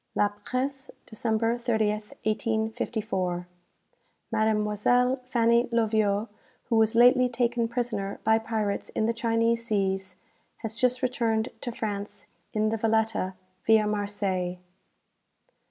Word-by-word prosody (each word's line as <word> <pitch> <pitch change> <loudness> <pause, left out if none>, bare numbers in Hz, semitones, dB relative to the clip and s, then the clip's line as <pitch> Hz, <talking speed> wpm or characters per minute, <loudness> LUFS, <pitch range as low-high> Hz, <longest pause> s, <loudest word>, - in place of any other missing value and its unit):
'" - - -47
"La 205 - +3
Presse," 260 +6 -4 0.2
December 225 +1 -1
30th, 215 -3 0
1854. 215 -4 -1 0.9
"Mademoiselle 220 +3 +2
Fanny 235 -1 +3
Loviot, 215 -2 +2 0.4
who 235 - -1
was 225 0 +3
lately 250 +1 +6
taken 240 -1 0
prisoner 225 -5 -3
by 220 +1 +4
pirates 220 -2 -2
in 220 - +1
the 230 - +1
Chinese 230 0 +1
seas, 195 -4 -1 0.5
has 220 -1 -4
just 250 +1 +1
returned 230 -3 +1
to 240 - -3
France 205 -3 -5 0.3
in 215 0 +1
the 225 - -1
'Valetta,' 220 -4 +1 0.3
via 220 -1 +5
Marseilles." 200 -3 -2
220 Hz, 115 wpm, -27 LUFS, 210-235 Hz, 0.9 s, lately